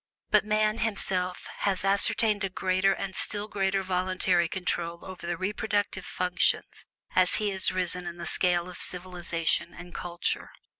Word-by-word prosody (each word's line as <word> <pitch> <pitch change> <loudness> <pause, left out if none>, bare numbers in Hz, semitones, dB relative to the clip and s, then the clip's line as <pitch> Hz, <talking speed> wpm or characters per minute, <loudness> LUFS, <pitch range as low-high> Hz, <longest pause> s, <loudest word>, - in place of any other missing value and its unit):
but - - +5
man, 215 +1 +1
himself, 190 -5 -1
has 195 -2 0
asserted 205 +1 +3
a 195 - 0
greater 185 +1 +2
and 195 -1 -3
still 205 +2 0
greater 195 -2 0
voluntary 185 -1 +1
control 170 -1 -3
over 185 -2 -8
the 175 -1 -1
reproductive 205 0 -1
functions 180 -1 0 0.3
as 185 -1 +4
he 210 -1 +1
has 190 -1 +1
risen 180 -1 -1
in 175 0 -6
the 170 - -6
scale 175 -1 +2
of 180 - -8
civilization 175 -2 0
and 175 +1 -10
culture. 175 0 -2
185 Hz, 150 wpm, -28 LUFS, 180-195 Hz, 0.3 s, but